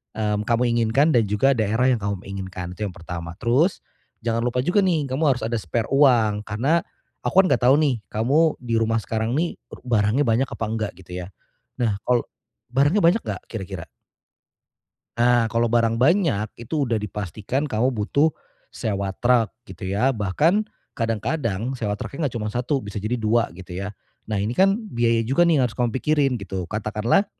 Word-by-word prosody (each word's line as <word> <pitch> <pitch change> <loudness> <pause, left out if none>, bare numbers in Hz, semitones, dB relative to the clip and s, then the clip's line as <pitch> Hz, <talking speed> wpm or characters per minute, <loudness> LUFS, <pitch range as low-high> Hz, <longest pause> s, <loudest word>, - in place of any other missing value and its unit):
mmm, 105 -1 -1
kamu 120 0 +2
inginkan 120 +7 +3
dan 115 - +5
juga 105 +7 +3
daerah 110 +4 +2
yang 120 - +1
kamu, 100 -2 -3
mmm, - - -13
inginkan 95 -2 -6
itu 105 +1 -3
yang 90 - -9
pertama. 85 0 -7
Terus 135 +10 +2 0.4
jangan 115 -1 0
lupa 125 +1 0
juga 175 +8 +2
nih, 165 -6 +1
kamu 140 +5 -1
harus 125 - -7
ada 120 - -2
spare 110 +5 -2
uang, 120 -7 +4
karena 130 +11 +1 0.4
aku 190 +1 +4
kan - - 0
nggak - - +3
tahu 130 +2 +7
nih 145 -5 +2 0.2
kamu 120 +8 +2 0.2
di 120 -2 -4
rumah 115 0 +1
sekarang 110 +2 -2
nih 170 +3 0 0.2
ru - - -10
barangnya 115 +2 +2
banyak 115 +4 +2
apa - - -5
nggak 110 -2 -2
gitu 90 - -15
ya. - - -11 0.5
Nah, 105 -4 +1
kalau 125 -1 +3 0.5
barangnya 145 +10 +3
banyak 175 +7 +4
nggak - - -4
kira-kira? 95 -6 -6 1.3
Nah 120 -1 +3
kalau 115 0 +1
barang 115 -1 +2
banyak 145 - +3 0.2
itu 145 +5 -1
udah 115 -4 -1
dipastikan 105 - -3
kamu 125 -2 +1
butuh 135 +6 +1 0.4
sewa 100 -2 -2
truk 120 -2 +3 0.2
gitu 95 0 -7
ya, 110 +8 +2
bahkan 145 - +2 0.3
kadang-kadang 115 0 -2
sewa 105 -5 -2
truk - - -7
nggak 145 - +1
cuma 110 -3 -3
1, 125 +4 0
bisa 105 0 -5
jadi 115 +4 -1
2 115 +1 +1
gitu 90 0 -10
ya, - - -4 0.4
nah 105 - 0
ini 105 +4 -1
kan 195 +6 +4 0.2
biaya 115 -1 +2
juga 135 +9 +3
nih 170 -2 +4
yang - - +4
harus 115 - -4
kamu 120 -1 +1
pikirin 140 -3 +1
gitu, 95 -1 -4
katakanlah 110 - +1
115 Hz, 185 wpm, -23 LUFS, 105-135 Hz, 1.3 s, tahu